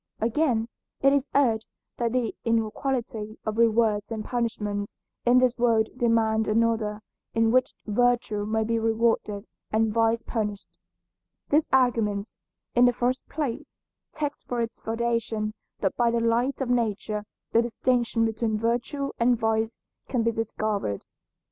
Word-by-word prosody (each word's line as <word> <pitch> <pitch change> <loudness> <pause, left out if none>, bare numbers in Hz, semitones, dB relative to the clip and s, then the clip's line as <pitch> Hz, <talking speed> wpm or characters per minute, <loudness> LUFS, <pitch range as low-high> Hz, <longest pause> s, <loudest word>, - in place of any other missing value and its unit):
Again, 230 -1 +1 0.3
it 275 0 +5
is 280 0 +1
urged 230 -6 +3 0.3
that 235 -1 0
the 245 -2 0
inequality 230 -1 -1
of 215 +1 -2
rewards 220 -2 +3
and 220 -2 -4
punishments 210 -4 -2 0.3
in 245 +1 +6
this 255 -1 +4
world 225 -2 +3
demand 225 -3 +2
another 220 -1 +1 0.3
in 225 0 +3
which 255 +1 +2
virtue 230 -1 +1
may 220 0 +1
be 230 +1 0
rewarded 225 -2 +1 0.3
and 220 0 +2
vice 230 0 +2
punished. 210 -3 -4 0.7
This 300 +2 +3
argument, 230 -5 +2 0.4
in 245 +1 +6
the 245 - +4
first 250 +2 -1
place, 285 -6 -4 0.4
takes 295 -1 -3
for 245 - -3
its 230 -1 -3
foundation 225 -2 -1 0.3
that 195 - 0
by 240 -1 +3
the 235 0 +1
light 235 +4 +1
of 260 - -1
nature 215 -3 0 0.3
the 230 - +5
distinction 235 0 +1
between 220 -1 0
virtue 240 +5 -1
and 240 +1 +4
vice 225 0 0 0.3
can 245 -4 +1
be 230 - +2
discovered. 215 - -2
230 Hz, 140 wpm, -26 LUFS, 220-245 Hz, 0.7 s, in